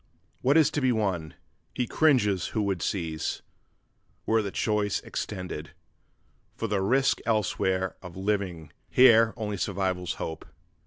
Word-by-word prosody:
What 140 Hz, +5 st, +4 dB
is 155 Hz, -1 st, +5 dB
to 145 Hz, -, -1 dB
be 130 Hz, -1 st, +3 dB
won? 95 Hz, -9 st, -1 dB, 0.4 s
He 125 Hz, -, 0 dB
cringes 115 Hz, -, +2 dB
who 110 Hz, -, +2 dB
would 95 Hz, -4 st, -1 dB
seize, 80 Hz, -5 st, -2 dB, 0.8 s
were 110 Hz, 0 st, +3 dB
the 100 Hz, -, -3 dB
choice 105 Hz, 0 st, 0 dB
extended, 90 Hz, -5 st, -6 dB, 0.8 s
For 115 Hz, -, -3 dB
the 100 Hz, -2 st, 0 dB
risk 130 Hz, +7 st, +2 dB
elsewhere 95 Hz, -4 st, 0 dB
of 90 Hz, -1 st, -10 dB
living, 95 Hz, -6 st, -2 dB, 0.2 s
here 115 Hz, -3 st, +6 dB
only 105 Hz, -3 st, -3 dB
survival's 95 Hz, -2 st, -1 dB
hope! 80 Hz, -1 st, -6 dB
100 Hz, 135 wpm, -27 LUFS, 90-115 Hz, 0.8 s, here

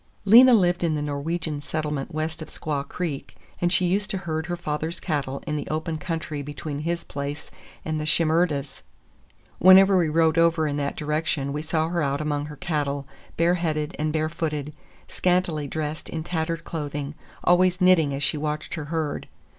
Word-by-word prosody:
Lena 240 Hz, +5 st, +9 dB
lived 175 Hz, -4 st, +2 dB
in 160 Hz, -2 st, +1 dB
the 150 Hz, -, -2 dB
Norwegian 150 Hz, +1 st, -3 dB
settlement 150 Hz, -2 st, -3 dB
west 155 Hz, +1 st, -3 dB
of 160 Hz, -, -6 dB
Squaw 150 Hz, -3 st, -3 dB
Creek, 165 Hz, -6 st, -4 dB, 0.3 s
and 175 Hz, 0 st, +2 dB
she 185 Hz, -, +3 dB
used 200 Hz, +4 st, +1 dB
to 195 Hz, -, -1 dB
herd 160 Hz, -3 st, -3 dB
her 175 Hz, -1 st, -2 dB
father's 160 Hz, 0 st, -3 dB
cattle 140 Hz, -5 st, -2 dB
in 150 Hz, -2 st, -2 dB
the 145 Hz, -, -4 dB
open 160 Hz, +1 st, -2 dB
country 155 Hz, -3 st, -4 dB
between 145 Hz, +1 st, -5 dB
his 170 Hz, +2 st, -2 dB
place 145 Hz, 0 st, -6 dB, 0.3 s
and 155 Hz, -1 st, -1 dB
the -, -, -3 dB
Shimerdas'. 155 Hz, -3 st, +1 dB, 0.8 s
Whenever 190 Hz, +1 st, +8 dB
we 170 Hz, -4 st, +3 dB
rode 160 Hz, +1 st, +3 dB
over 165 Hz, -1 st, +3 dB
in 145 Hz, -1 st, -1 dB
that 140 Hz, -1 st, -2 dB
direction 150 Hz, -2 st, -1 dB
we 150 Hz, -, -2 dB
saw 160 Hz, 0 st, 0 dB
her 170 Hz, 0 st, 0 dB
out 140 Hz, -1 st, 0 dB
among 150 Hz, -1 st, -2 dB
her 150 Hz, -, -8 dB
cattle, 145 Hz, -4 st, -2 dB, 0.3 s
bareheaded 165 Hz, -2 st, +1 dB
and 155 Hz, 0 st, 0 dB
barefooted, 155 Hz, -1 st, -2 dB, 0.3 s
scantily 175 Hz, -5 st, 0 dB
dressed 155 Hz, +1 st, -4 dB
in 160 Hz, -1 st, -4 dB
tattered 165 Hz, -1 st, -2 dB
clothing, 145 Hz, -2 st, -4 dB, 0.3 s
always 180 Hz, +1 st, +4 dB
knitting 180 Hz, -6 st, +5 dB
as 140 Hz, +1 st, -2 dB
she 155 Hz, -, +1 dB
watched 150 Hz, 0 st, -3 dB
her 155 Hz, -3 st, -4 dB
herd. 155 Hz, -1 st, -3 dB
155 Hz, 175 wpm, -25 LUFS, 150-170 Hz, 0.8 s, Lena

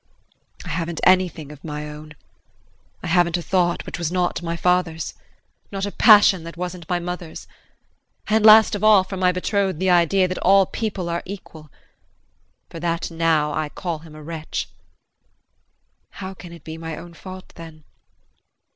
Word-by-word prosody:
I -, -, -7 dB
haven't 165 Hz, 0 st, -3 dB
anything 175 Hz, -5 st, +2 dB
of 150 Hz, -2 st, -14 dB
my 150 Hz, -1 st, -5 dB
own. 150 Hz, 0 st, -10 dB, 0.9 s
I -, -, -4 dB
haven't 175 Hz, 0 st, +2 dB
a -, -, -4 dB
thought 175 Hz, -2 st, 0 dB
which -, -, -6 dB
was 170 Hz, -1 st, -2 dB
not 180 Hz, -1 st, 0 dB
my 170 Hz, 0 st, -3 dB
father's 180 Hz, -3 st, 0 dB, 0.6 s
not 195 Hz, 0 st, -3 dB
a 205 Hz, -, -4 dB
passion 205 Hz, -6 st, +6 dB
that 170 Hz, 0 st, -9 dB
wasn't 180 Hz, -1 st, -6 dB
my 180 Hz, -, +1 dB
mother's. 175 Hz, -1 st, -6 dB, 0.8 s
And 215 Hz, 0 st, +2 dB
last 220 Hz, +1 st, +8 dB
of 205 Hz, -, -3 dB
all 215 Hz, -3 st, +6 dB
from 190 Hz, 0 st, -7 dB
my 180 Hz, -1 st, +3 dB
betrothed 190 Hz, -1 st, -1 dB
the 190 Hz, 0 st, +2 dB
idea 180 Hz, +2 st, +3 dB
that 185 Hz, -, -4 dB
all 195 Hz, +1 st, +5 dB
people 200 Hz, -4 st, -4 dB
are 170 Hz, 0 st, -2 dB
equal. 165 Hz, -5 st, -10 dB, 1.0 s
For 165 Hz, -, -7 dB
that 170 Hz, 0 st, -2 dB
I -, -, -11 dB
now 155 Hz, -2 st, +1 dB
call 170 Hz, 0 st, -4 dB
him 155 Hz, -1 st, -14 dB
a 155 Hz, -, -11 dB
wretch. 160 Hz, 0 st, -5 dB, 1.4 s
How 190 Hz, -1 st, -8 dB
can 180 Hz, -2 st, -12 dB
it 170 Hz, -, -13 dB
be 160 Hz, 0 st, -8 dB
my 165 Hz, -1 st, -6 dB
own 170 Hz, +1 st, -10 dB
fault 185 Hz, +2 st, -10 dB
then? 160 Hz, -2 st, -12 dB
175 Hz, 165 wpm, -22 LUFS, 165-185 Hz, 1.4 s, last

